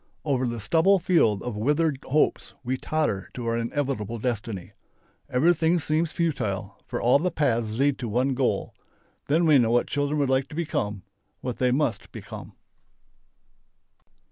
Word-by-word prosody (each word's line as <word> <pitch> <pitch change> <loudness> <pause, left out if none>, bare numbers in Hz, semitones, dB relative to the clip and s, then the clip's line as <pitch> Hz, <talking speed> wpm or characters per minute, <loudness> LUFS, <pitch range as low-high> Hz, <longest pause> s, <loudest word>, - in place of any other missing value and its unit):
Over 130 -4 +1
the 120 -1 -3
stubble 165 - +4
field 165 - +2
of 120 -3 -4
withered 145 +5 +1
hopes 150 +3 0
we 130 +1 -1
totter 130 -9 -1
to 125 - -5
our 115 0 0
inevitable 115 -2 -2
destiny. 110 -5 -4 0.6
Everything 165 +5 +3
seems 155 0 0
futile, 125 - -2
for - - -3
all 125 +4 +4
paths 115 -9 0
lead 140 +1 +2
to 120 - -3
one 125 +5 +1
goal. 130 -1 -1 0.5
Then 160 +4 +3
we 150 -4 +6
know 115 -2 +3
what 120 +1 +3
children 145 +1 -1
would 140 - +2
like 130 0 +1
to 155 - -10
become, 105 - -2 0.4
what 125 -2 -4
they 125 - +3
must 125 -5 -1
become. - - -9
130 Hz, 150 wpm, -26 LUFS, 115-155 Hz, 0.6 s, we